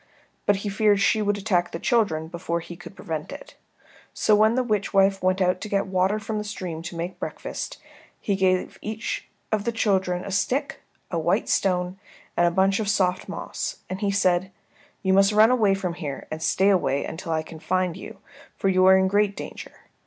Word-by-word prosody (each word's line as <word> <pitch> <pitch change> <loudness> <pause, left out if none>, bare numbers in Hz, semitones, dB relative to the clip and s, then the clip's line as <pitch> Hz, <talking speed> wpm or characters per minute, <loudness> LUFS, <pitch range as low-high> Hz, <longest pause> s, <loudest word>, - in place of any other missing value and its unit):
But 205 - +5
he - - 0
feared 205 0 +3
she 215 +2 +3
would 205 -1 +1
attack 190 -4 0
the - - -4
children 170 -8 +1
before 170 0 -3
he 170 +1 -9
could 175 +3 -12
prevent 160 -6 -5
it. - - -10 0.6
So 215 - +4
when 215 +2 +4
the 255 - +2
witch 210 -4 -1
wife 195 0 +4
went 185 +1 +1
out 180 0 +2
to 215 - -5
get 200 -1 +1
water 190 +2 +1
from 215 0 -3
the - - -3
stream 185 -6 -5
to 170 - -7
make 170 +2 -5
breakfast, - - -5 0.4
he 200 - -1
gave 185 -1 0
each 220 +1 -4 0.2
of 215 -2 +1
the 235 - 0
children 190 -5 0
a 200 - -5
stick, 265 +9 -1 0.3
a - - 0
white - - +1
stone, 180 0 0 0.4
and 175 - +4
a - - +4
bunch 190 +3 +2
of 210 -2 -1
soft 185 -3 +1
moss, - - -5
and 185 - -4
he 205 - +1
said, 190 -1 +1 0.5
"You 190 -1 +3
must 195 +2 +5
run 215 +3 +6
away 215 -6 +3
from 185 -3 -3
here 150 -5 -6
and 155 +1 -5
stay 190 +4 +3
away 140 -8 +2
until 165 0 -6
I 160 -1 0
can 160 0 -11
find 185 0 0
you, 190 - -9 0.4
for 195 - +1
you 185 0 +4
are 190 0 +8
in 190 0 +3
great 205 +1 +2
danger. - - -9
190 Hz, 205 wpm, -24 LUFS, 180-205 Hz, 0.6 s, are